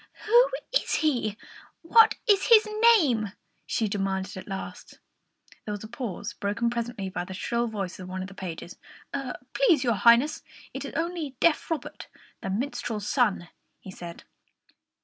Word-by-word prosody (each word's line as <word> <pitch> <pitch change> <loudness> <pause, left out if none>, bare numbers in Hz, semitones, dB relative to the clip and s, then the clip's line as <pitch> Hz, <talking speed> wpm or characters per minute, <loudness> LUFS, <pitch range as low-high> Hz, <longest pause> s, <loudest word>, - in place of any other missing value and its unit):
"Who 480 +3 +6 0.2
is - - +1
he? 240 -9 0 0.5
What 445 +6 +6
is 405 -4 +3
his 445 -2 +7 0.3
name?" 230 - 0 0.3
she 220 - 0
demanded 195 -1 -2
at 185 - -8
last. 195 -1 -7 0.7
There 210 - -5
was 205 - -6
a - - -7
pause, 225 -3 -5
broken 230 +3 -1
presently 235 -4 -3
by 180 -1 -3
the 190 +1 -8
shrill 235 +4 -1
voice 200 -4 -5
of 185 0 -8
one 185 0 -4
of - - -6
the 200 - -12
pages. 180 -2 -7 0.7
"Please, 345 - +4
your 240 -2 +2
Highness, 235 - +4 0.3
it - - -5
is - - -7
only 325 -4 -3
deaf 335 -2 +2
Robert, 325 -2 -4 0.3
the - - -4
minstrel's 215 -1 -3
son," 210 -9 +1 0.3
he 190 - -10
said. 170 -2 -9
225 Hz, 155 wpm, -27 LUFS, 195-295 Hz, 0.7 s, his